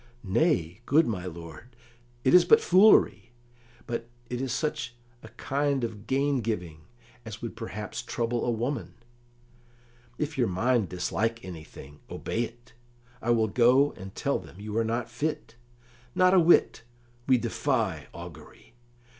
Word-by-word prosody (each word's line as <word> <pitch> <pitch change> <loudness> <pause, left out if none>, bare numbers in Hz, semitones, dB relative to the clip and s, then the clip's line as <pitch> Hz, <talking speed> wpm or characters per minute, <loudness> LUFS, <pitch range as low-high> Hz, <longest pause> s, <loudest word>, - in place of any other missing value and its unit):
"Nay, 95 - +1
good 155 +4 +5
my 95 -5 -3
lord 85 +8 -10 0.2
" 120 0 -33
"It 130 - +3
is 180 - +8
but 450 +1 +6
foolery; 210 - +4 0.5
but 115 0 -4 0.2
it 125 0 -2
is 135 -2 -2
such 150 -6 -2 0.3
a - - -11
kind 140 -1 -1
of 110 -2 -5
gain 140 +1 +1
giving 90 -8 -4 0.4
as 110 -1 -8
would 115 - -5
perhaps 105 +2 -6
trouble 120 0 -2
a - - 0
woman." 120 +3 -2 1.2
"If 150 -2 -3
your 120 - +3
mind 110 +3 +1
dislike 110 +6 -2
anything, 80 -4 -10
obey 115 - -3
it. 120 +1 -15 0.5
I 120 - -3
will 115 -2 +3
go 125 +6 +4
and 95 +1 -11
tell - - 0
them 90 - -14
you 105 +1 -6
are - - +2
not 115 +1 -2
fit." 120 0 -4 0.6
"Not 185 0 +5
a 190 - +7
whit; 170 -6 +4 0.5
we 130 -1 +5
defy 115 - -1
augury. - - -12
120 Hz, 145 wpm, -27 LUFS, 105-135 Hz, 1.2 s, is